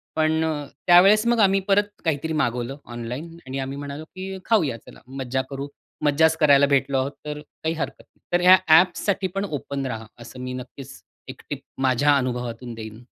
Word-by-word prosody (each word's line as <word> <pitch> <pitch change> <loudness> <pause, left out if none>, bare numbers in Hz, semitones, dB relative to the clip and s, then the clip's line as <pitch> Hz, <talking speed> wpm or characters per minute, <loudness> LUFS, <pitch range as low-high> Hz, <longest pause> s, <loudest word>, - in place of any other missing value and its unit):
पण 160 0 +2
अ, 155 -2 -2 0.2
त्यावेळेस 195 +5 +7
मग 235 -1 +3
आम्ही 195 -2 +4
परत 205 +1 +3 0.2
काहीतरी 160 0 -1
मागवलं 125 -2 -1
ऑनलाईन 125 +8 -7
आणि 135 +1 -4
आम्ही 135 +1 -4
म्हणालो, 145 +1 -6
की 190 +3 -7
"खाऊया 160 - +2
चला, - - -14
मज्जा 130 0 -3
करू." 140 0 -5 0.4
मज्जाच 160 +2 +4
करायला 145 -2 +5
भेटलो 140 -1 +2
आहोत, 130 +2 -1
तर 150 0 -5
काही 160 +2 -5
हरकत 160 - -5
नाही. - - -38
तर 175 - +3
या 185 +1 +8
ॲप्ससाठी 185 +4 +4
पण 195 - -1
ओपन 140 -5 -4
राहा, 115 -3 -5 0.2
असं 120 +2 -11
मी 125 0 -5
नक्कीच 130 +2 -9 0.3
एक - - -9
टिप - - -4 0.2
माझ्या 135 +2 +3
अनुभवातून 125 -2 -3
देईन. 110 +1 -9
145 Hz, 180 wpm, -23 LUFS, 130-165 Hz, 0.4 s, या